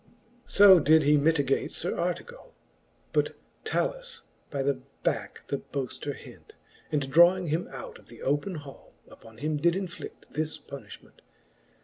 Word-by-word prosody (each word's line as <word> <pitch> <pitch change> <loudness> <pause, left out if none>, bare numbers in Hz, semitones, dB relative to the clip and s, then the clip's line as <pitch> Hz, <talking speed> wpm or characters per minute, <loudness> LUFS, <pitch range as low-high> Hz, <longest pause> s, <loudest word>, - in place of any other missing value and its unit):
XXXVII. 240 +1 -32
So 195 -3 +10
did 155 +1 +5
he 150 +1 +5
mitigate 145 -2 +2
Sir 175 - -3
Artegall, 480 - -4 0.6
But - - +1 0.3
Talus - - -2 0.3
by 140 -3 -2
the 135 -1 0 0.2
backe - - -2
the 140 - -2
boafter 140 +1 -5
hent, - - -14 0.4
And 140 -3 -1
drawing 175 +2 +6
him 160 +4 -1
out 135 -2 -9
of - - -21
the 115 -1 -12
open 145 +7 0
hall, 145 -3 -11 0.2
Upon 110 -1 -15
him 150 +4 -1
did 170 +3 +2
infli<9: 190 0 -6
this 155 +2 -2
punifliment. 115 -9 -12
155 Hz, 145 wpm, -28 LUFS, 140-185 Hz, 0.6 s, So